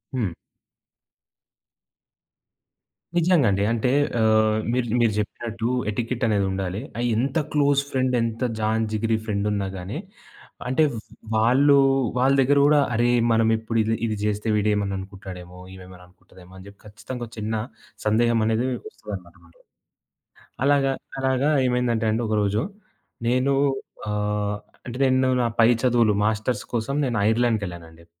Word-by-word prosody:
హ్మ్. 105 -9 -1 2.8
నిజంగా 170 -6 +4
అండి. 100 +1 0
అంటే 115 +2 +1 0.3
ఆహ్, 110 0 +3
మీరు 125 -1 0
మీరు 115 - +3
జెప్పినట్టు 115 +2 -3 0.2
ఎటికెట్ 120 +3 -3
అనేదుండాలి. 95 -1 -1 0.2
ఆహ్, 120 - -1
ఎంత 135 +5 0 0.2
క్లోజ్ 140 -1 +3
ఫ్రెండ్ 130 -1 +1
ఎంత 115 +1 -3 0.2
జాన్ 110 +1 +1
జిగిరి 110 +1 0
ఫ్రెండ్ 105 -2 -1
ఉన్నా 100 -2 -1
గాని 95 +9 -6 0.7
అంటే 130 +5 +2 0.5
వాళ్ళు 130 +6 +4 0.4
వాళ్ళ 130 +2 +3
దగ్గర 140 +2 +3
కూడా 150 0 +5
అరె! 120 +2 +2 0.2
మనం 115 0 +3
ఇప్పుడు 115 +1 -3
ఇది 115 +1 0
ఇది 110 -1 -1
జేస్తే 105 +1 -1
వీడేమన్నా 105 -2 0
అనుకుంటాడేమో, 95 -2 -10
ఈమేమేమన్నా 90 -1 -13
అనుకుంటదేమో 90 0 -19
అని 95 - -12
చెప్పి 100 0 -15
ఖచ్చితంగా 120 +4 -8
ఒక - - -20
చిన్న 110 +1 -3 0.5
సందేహం 115 +2 +3
అనేది 115 +3 +1
మీకు 125 - -6
వస్తదన్నమాట. 90 -4 -11 1.1
అలాగా 140 -1 +3 0.3
అలాగా 130 +2 +1 0.2
ఏమైందంటే 120 -3 0
అండి 115 +2 -1
ఒకరోజు 105 0 +1 0.7
నేను 130 +3 +2 0.6
ఆహ్, 105 0 -1 0.3
అంటే 125 +1 -6
నేను 130 0 +3
నా 120 - +1
పై 115 - +6 0.2
చదువులు 120 -4 +3
మాస్టర్స్ 110 +3 -1
కోసం 120 +4 -1
నేను 120 -4 -1
ఐర్లాండ్‌కెళ్ళానండి. 90 -8 -2
110 Hz, 130 wpm, -23 LUFS, 100-125 Hz, 2.8 s, పై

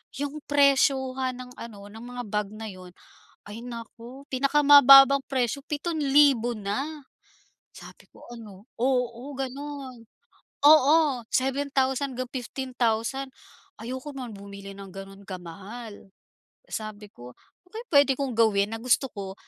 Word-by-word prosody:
yung 285 +2 -4
presyohan 265 -2 +2
ng 250 0 -10
ano 205 -3 -10
ng 220 - -11 0.2
mga 245 - -4
bag 210 -1 -1
ngayon, 195 -4 -10 0.5
ay 225 +3 -8
naku 240 +3 -10
pinakamababang 275 0 +7
presyo 260 0 -2
7,000 285 -6 +2
na. 275 +10 -4 0.7
Sabi - - -14
ko - - -17
ano, 215 -2 -12
oo 250 +1 -1
gano'n, 270 -2 -7 0.6
oo 300 -2 +5
7,000 270 0 -1
hanggang 255 -1 -5
15,000. 250 0 -2 0.5
Ayoko 260 +5 -6
nga 255 -2 -6
bumili 200 -1 -10
ng 195 0 -11
gano'n 195 +1 -11
kamahal. 200 +5 -9 0.6
Sabi 215 -1 -7
ko, 125 -5 -13
"Ano 360 - -32
kaya 455 +2 -6
puwede 285 -2 +5
kong 270 -1 -3
gawin 210 -3 +3
na 225 - -4
gusto 250 +3 +1
ko 195 -2 -7
250 Hz, 120 wpm, -26 LUFS, 215-275 Hz, 0.7 s, pinakamababang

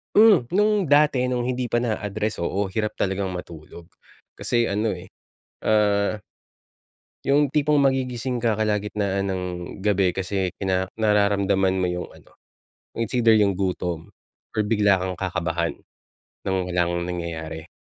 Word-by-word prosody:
Hmm 210 - +7
nung 210 +1 +3
dati 145 -3 +4
nung 125 -1 0
hindi 125 -1 -2
pa 120 - +3
naa-address, 110 -2 -2
oo. 100 +3 -1
Hirap 105 +3 -2
talagang 95 -1 -1
matulog 85 -1 -9 0.5
kasi 120 -1 0
ano 105 +2 0
eh, 90 0 -8 0.5
ah, 105 -1 +2 1.1
yung 145 +2 +3
tipong 150 +1 +2
magigising 130 -3 0
ka 115 -3 +1
kalagitnaan 105 -2 -1
ng 95 -1 -2 0.4
gabi 100 -2 +2
kasi 95 0 -2
kina 95 -1 -1
nararamdaman 100 -3 +2
mo 90 - +1
yung 90 0 -4
ano, - - -19 0.6
it's 115 0 -2
either 120 -2 +4
yung 105 -2 +3
gutom 90 -3 -3 0.5
or - - +4
bigla 105 -2 +3
kang 95 0 -3
kakabahan 85 -2 -2 0.7
ng 95 - +1 0.2
walang 85 0 0
nangyayari. 85 -2 -5
100 Hz, 130 wpm, -24 LUFS, 95-120 Hz, 1.1 s, Hmm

